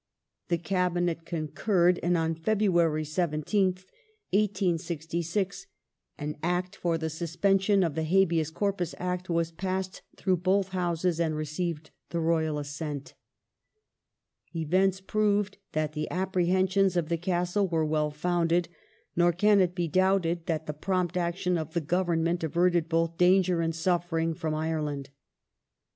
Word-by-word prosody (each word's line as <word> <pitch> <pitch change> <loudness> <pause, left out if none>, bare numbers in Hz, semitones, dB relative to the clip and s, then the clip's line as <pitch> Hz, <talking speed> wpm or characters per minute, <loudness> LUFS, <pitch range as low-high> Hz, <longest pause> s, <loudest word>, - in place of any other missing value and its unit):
The 170 - +1
Cabinet 175 -2 -1
con 155 -3 -3
curred, 180 -1 +2
and 175 +1 +2
on 165 0 0
February 170 -3 +2
17th, 180 +4 0 0.5
1866, 180 - -1 0.5
an 150 0 -4
Act 180 +2 -1
for 170 -2 0
the 160 0 -2
suspension 190 +5 +1
of 165 -4 0
the 160 - -2
Habeas 170 -3 +2
Corpus 190 0 -2
Act 180 0 -3
was 170 -1 0
passed 185 +2 -3 0.2
through 185 -2 +1
both 190 +2 +1
Houses 175 -2 -1
and 160 -2 +1
received 155 +1 -3 0.2
the 170 - -2
Royal 160 -2 +1
assent.^ 145 0 -5 1.5
Events 190 +4 +2
proved 205 0 0
that 155 -1 -1
the 155 0 -3
apprehensions 185 +1 +1
of 165 -3 0
the 170 - +1
Castle 180 +3 0
were 165 -3 0
well 150 0 +1
founded, 170 +2 0 0.5
nor 175 0 +4
can 205 +4 +4
it 180 -1 +1
be 175 -2 0
doubted 180 -1 +1
that 160 -1 -1
the 150 - -4
prompt 180 +3 -1
action 180 0 0
of 160 0 -6
the - - +3
Government 170 +1 0
averted 170 +1 +2
both 165 0 0
danger 180 -1 +4
and 165 -1 -1
suffering 165 -1 0
from 155 -1 -3
Ireland. 150 -3 -2
175 Hz, 135 wpm, -28 LUFS, 160-185 Hz, 1.5 s, nor